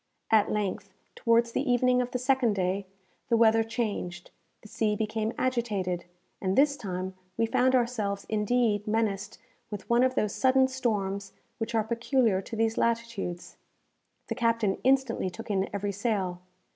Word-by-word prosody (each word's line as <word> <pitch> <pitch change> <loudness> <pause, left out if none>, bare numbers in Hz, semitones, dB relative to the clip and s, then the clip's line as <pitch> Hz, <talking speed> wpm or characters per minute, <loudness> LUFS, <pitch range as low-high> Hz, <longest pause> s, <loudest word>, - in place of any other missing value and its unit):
At 215 -2 +4
length, 200 -1 -3 0.2
towards 230 0 +2
the - - 0
evening 250 +1 +3
of 245 - -2
the 250 - -2
second 250 -3 +2
day, 190 +1 -1 0.4
the 230 - +4
weather 225 0 +5
changed, 205 -6 -4 0.3
the - - -11
sea 210 0 0
became 220 +1 -1
agitated, 210 -9 -1 0.4
and 190 0 0
this 280 +1 +5
time 185 -6 -4 0.2
we 230 - +3
found 255 +3 +3
ourselves 220 -5 0
indeed 215 -1 +1
menaced 210 -2 -1 0.3
with 205 -2 -7
one 235 +1 +5
of 255 0 +2
those 210 -2 0
sudden 260 0 +4
storms 205 -7 -2 0.3
which 230 0 -3
are 220 - +3
peculiar 230 -2 +1
to 225 - -7
these 225 0 +1
latitudes. 230 -7 -2 0.7
The - - -2
captain 230 -4 +1
instantly 260 -6 +2
took 180 +4 -7
in 195 -1 0
every 200 0 -2
sail. 195 -4 -2
220 Hz, 155 wpm, -28 LUFS, 200-240 Hz, 0.7 s, weather